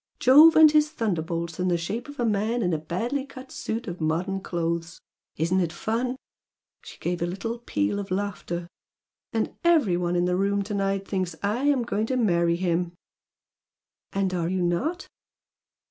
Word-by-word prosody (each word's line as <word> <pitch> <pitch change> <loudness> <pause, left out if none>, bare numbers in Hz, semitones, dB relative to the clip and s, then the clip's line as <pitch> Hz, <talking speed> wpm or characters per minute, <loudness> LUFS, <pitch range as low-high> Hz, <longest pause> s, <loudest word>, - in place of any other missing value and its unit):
Jove 300 +6 +8
and 315 -1 +8
his 300 0 +4
thunderbolts 170 - -2
in 180 - +1
the 175 -1 +2
shape 215 - -4
of 290 0 -11
a 240 - +1
man 220 +2 0
in 180 -2 +1
a 155 - 0
badly 230 - -2
cut 265 -1 -11
suit 225 +2 -4
of 175 -2 -6
modern 180 +5 -1
clothes! 170 -1 -3 0.4
Isn't 170 +4 +1
it 170 -3 0
fun!" 230 +8 -2 0.7
She - - -12
gave 175 0 -3
a 170 - +1
little 225 +6 -4
peal 105 - -1
of 200 - -5
laughter. 185 -3 -3 0.6
"And - - -1
every 310 - +4
one 175 0 -1
in 175 0 +2
the 180 0 +1
room 200 +1 +1
to 210 +2 -5
night 195 -1 -1
thinks 185 -4 -2
I 220 +7 0
am 280 -4 +3
going 220 -1 -1
to 260 - 0
marry 170 -7 +2
him!" 175 -1 -1 1.2
"And 195 -1 0
are 170 -2 -1
you 185 -1 0
not?" 255 - -1
195 Hz, 175 wpm, -26 LUFS, 175-235 Hz, 1.2 s, Jove